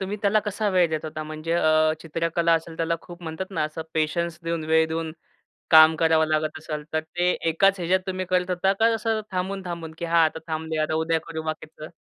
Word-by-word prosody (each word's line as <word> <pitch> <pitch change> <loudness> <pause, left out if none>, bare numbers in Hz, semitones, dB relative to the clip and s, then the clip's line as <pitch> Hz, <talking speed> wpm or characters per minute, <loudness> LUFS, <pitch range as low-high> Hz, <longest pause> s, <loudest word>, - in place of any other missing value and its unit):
तुम्ही 195 +2 -3
त्याला 210 +1 +3
कसा 210 +1 -2
वेळ 180 -2 +3
देत 155 -1 -2
होता? 155 0 -5
म्हणजे 155 +1 -5
अ, 155 -1 +3
चित्रकला 165 +1 0
असेल 165 0 -3
त्याला 165 0 0
खूप 175 0 -12
म्हणतात 165 +4 -5
ना, 190 - -1
असं 155 +1 -5
पेशन्स 165 +2 -1
देऊन, 165 -1 -2
वेळ 160 +1 +3
देऊन 160 0 -3 0.6
काम 160 0 +8
करावं 160 0 +3
लागत 155 0 -1
असेल. 150 -1 -5
तर 160 - +2
ते 175 +3 -1 0.2
एकाच 195 +4 +3
ह्याच्यात 180 +2 +2
तुम्ही 185 0 -2
करत 180 0 +1
होता 185 +2 +1
का, 230 +1 +4
असं 225 0 -1
थांबून-थांबून, 180 -3 -4
की 170 - -4
"हां, 165 0 +4
आता 160 0 -2
थांबूया. 160 0 -2
आता 155 - -2
उद्या 160 +1 +1
करू 160 -1 -5
बाकीचं?" 155 -1 -6
165 Hz, 205 wpm, -24 LUFS, 155-180 Hz, 0.6 s, काम